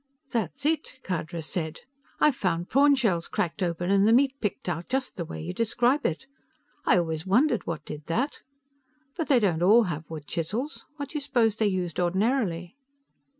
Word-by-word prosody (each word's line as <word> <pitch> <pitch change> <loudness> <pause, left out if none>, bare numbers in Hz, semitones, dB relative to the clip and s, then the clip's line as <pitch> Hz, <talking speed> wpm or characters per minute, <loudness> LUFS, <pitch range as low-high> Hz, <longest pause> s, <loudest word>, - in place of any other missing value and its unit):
"That's 235 - -2
it!" 310 -3 0
Khadra 170 -2 -3
said. 160 -1 -3 0.4
"I've 300 -4 +4
found 175 -6 -1
prawn 280 +3 +5
shells 195 -11 +1
cracked 175 +3 -2
open 175 +1 -1
and 200 +1 +4
the - - +5
meat 270 +2 +4
picked 210 -3 -3
out, 170 -1 -3
just 265 0 -1
the 170 - -4
way - - -7
you 175 +3 -4
describe 240 +7 +2
it. 170 +11 -4 0.6
I 220 - +6
always 160 0 -1
wondered 240 +5 +2
what 165 -2 -4
did 150 0 -8
that. 245 - -1 0.8
But 325 -4 -2
they 265 -4 +5
don't 180 -7 +1
all 215 +6 +6
have 160 -5 -4
wood 155 -2 -7
chisels. 205 - -3
What 285 -1 -5
do 310 - -4
you - - -9
suppose 240 -6 +2
they 215 - +2
used 180 -4 -2
ordinarily?" 185 -1 0
195 Hz, 185 wpm, -27 LUFS, 170-255 Hz, 0.8 s, I